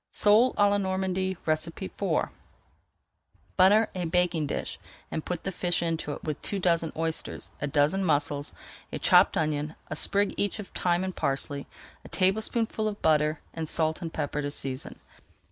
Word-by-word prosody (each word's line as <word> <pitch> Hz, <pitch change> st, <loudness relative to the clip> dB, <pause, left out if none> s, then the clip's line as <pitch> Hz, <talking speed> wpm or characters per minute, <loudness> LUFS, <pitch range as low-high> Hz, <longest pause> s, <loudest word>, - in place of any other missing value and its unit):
SOLE 220 Hz, +5 st, +4 dB
À 205 Hz, -1 st, +5 dB
LA 205 Hz, 0 st, +2 dB
NORMANDY 190 Hz, -1 st, -1 dB
IV 155 Hz, -, -1 dB, 1.3 s
Butter 210 Hz, +4 st, +6 dB
a 180 Hz, -2 st, -2 dB
baking 170 Hz, -2 st, +1 dB
dish -, -, -4 dB, 0.3 s
and 155 Hz, -, -3 dB
put 180 Hz, -2 st, -4 dB
the 195 Hz, -, -2 dB
fish 175 Hz, -1 st, 0 dB
into 165 Hz, -3 st, -2 dB
it -, -, -9 dB
with 155 Hz, -2 st, -4 dB
two 200 Hz, -, -2 dB
dozen 170 Hz, -3 st, +1 dB
oysters, 165 Hz, 0 st, -3 dB
a 145 Hz, -, 0 dB
dozen 150 Hz, +7 st, +2 dB
mussels, 145 Hz, -3 st, +1 dB, 0.4 s
a -, -, -3 dB
chopped -, -, +5 dB
onion, 150 Hz, 0 st, -1 dB, 0.2 s
a -, -, -1 dB
sprig 200 Hz, +5 st, +2 dB
each 205 Hz, +1 st, 0 dB
of 210 Hz, -3 st, -7 dB
thyme 175 Hz, 0 st, 0 dB
and 185 Hz, -1 st, -4 dB
parsley, 140 Hz, -1 st, -1 dB, 0.4 s
a -, -, -12 dB
tablespoonful 220 Hz, +3 st, +1 dB
of 210 Hz, -1 st, -4 dB
butter, 155 Hz, 0 st, +3 dB
and 160 Hz, -2 st, -4 dB
salt 160 Hz, +1 st, 0 dB
and 165 Hz, -2 st, -4 dB
pepper 150 Hz, -1 st, -2 dB
to 145 Hz, -, -2 dB
season. 135 Hz, -2 st, -5 dB
170 Hz, 160 wpm, -28 LUFS, 150-190 Hz, 1.3 s, Butter